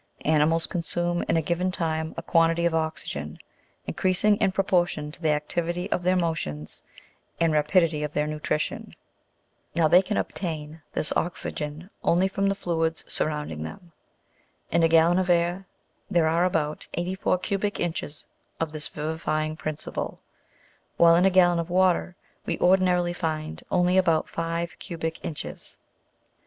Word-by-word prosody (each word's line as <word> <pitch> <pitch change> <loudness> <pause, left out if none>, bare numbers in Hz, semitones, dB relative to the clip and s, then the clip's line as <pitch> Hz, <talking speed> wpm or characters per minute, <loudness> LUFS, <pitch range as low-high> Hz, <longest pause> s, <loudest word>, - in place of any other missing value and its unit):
Animals 155 +2 +3
consume 175 0 -1
in 165 - +3
a 165 - +1
given 175 +3 0
time 160 -2 -1
a 165 - -4
quantity 165 0 +3
of 170 - +2
oxygen, 160 - -3 0.5
increasing 190 +3 +2
in 195 -3 +2
pro 195 +1 +1
portion 175 -5 0
to 170 - -13
the 160 - +1
activity 170 +5 -1
of - - +1
their 180 +1 +2
motions 155 - -2 0.6
and 165 -2 +3
rapidity 155 +1 +2
of 150 -1 -2
their 150 0 0
nutrition: 150 0 -3 0.8
now, 165 -2 +4
they 175 +4 +7
can 205 +2 -2
obtain 160 -3 -3
this 150 - +2
oxygen 165 0 -3
only 180 +3 +3
from 195 +1 0
the 195 - 0
fluids 165 -4 -1
surrounding 150 - -1
them; 170 - -8 0.8
in 170 - +3
a 165 - +5
gallon 165 +2 +5
of 185 -1 -1
air 175 +2 +1 0.4
there 170 -2 +3
are 165 +2 +3
about 155 -4 -1
84 185 +1 0
cubic 200 +2 -2
inches 160 -3 -3 0.3
of 165 -2 -1
this 155 -1 -3
vivifying 155 0 -2
principle, 155 -1 -5 0.8
while 170 0 +7
in 175 +2 +4
a - - +6
gallon 175 -2 +4
of 170 +1 -3
water 180 0 +2 0.3
we - - -1
ordinarily 180 -1 +3
find 155 -3 -3
only 180 +1 +3
about 165 -4 +2
five 165 +1 -3
cubic 165 -3 -5
inches. 155 - -5
165 Hz, 150 wpm, -26 LUFS, 155-180 Hz, 0.8 s, they